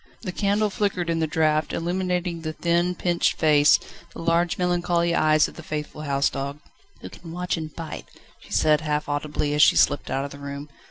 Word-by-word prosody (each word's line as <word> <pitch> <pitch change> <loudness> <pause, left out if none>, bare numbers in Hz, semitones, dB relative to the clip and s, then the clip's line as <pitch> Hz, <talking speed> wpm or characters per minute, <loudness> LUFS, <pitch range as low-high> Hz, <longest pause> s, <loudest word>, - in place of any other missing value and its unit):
The 185 - -3
candle 205 +2 0
flickered 185 -4 -1
in 165 - 0
the 160 - +1
draught, 155 0 +1
illumining 180 0 -2
the 155 -1 -4
thin, 170 +2 0
pinched 175 -1 0
face, 150 -2 +5 0.4
the - - -8
large 170 +1 +1
melancholy 175 -1 +1
eyes 155 -2 +4
of - - -13
the - - -7
faithful 150 0 -5
house 140 -1 +1
dog. 140 +1 -5 0.4
"Who - - -8
can 170 -2 -11
watch 180 +1 -2
and 160 -2 -6
bite!" 165 -2 -7 0.3
she - - -18
said 155 -1 +3
half 150 -1 -2
audibly 145 0 -2
as 150 - +2
she - - +6
slipped 145 - +2
out 135 +1 -1
of 140 - -7
the 140 - -10
room. 140 +1 -7
160 Hz, 200 wpm, -24 LUFS, 150-175 Hz, 0.4 s, she